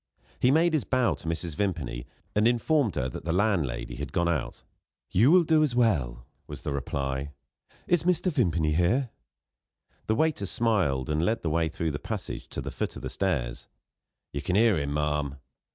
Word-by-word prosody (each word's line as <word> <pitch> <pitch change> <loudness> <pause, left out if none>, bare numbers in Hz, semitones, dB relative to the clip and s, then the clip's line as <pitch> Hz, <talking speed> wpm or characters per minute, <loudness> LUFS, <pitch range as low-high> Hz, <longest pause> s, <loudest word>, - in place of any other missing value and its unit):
He 125 - +4
made 160 +4 +4
his 155 - +2
bow 130 -3 +2
to - - -9
Mrs. 85 0 -3
Vimpany, 80 -12 -2 0.3
and 105 +2 +3
informed 120 - +2
her 65 -3 0
that 65 - -7
the 80 - -1
landlady 85 - 0
had 70 0 -5
gone 85 +2 +1
out. 80 -6 -2 0.5
"You 110 +9 +5
will 180 +2 +6
do 160 -1 +3
as 145 -6 +1
well," 70 - +1 0.2
was - - -8
the - - -2
reply. 70 +1 -3 0.5
"Is 175 -2 +2
Mr. 180 +1 +1
Vimpany 85 - +1
here?" 110 - +2 1.0
The 110 - +2
waiter 155 -8 +1
smiled, 90 - +1
and 75 +2 +1
led 115 +5 0
the 80 - 0
way 80 0 +1
through 80 +1 -2
the 70 - -4
passage - - -5
to - - -5
the - - -5
foot - - -3
of - - -9
the - - -4
stairs. 75 -12 -2 0.7
"You 70 - -3
can 90 - -1
hear 110 0 +5
him, 70 -1 -2
ma'am." 75 -1 -1
85 Hz, 185 wpm, -27 LUFS, 75-120 Hz, 1.0 s, will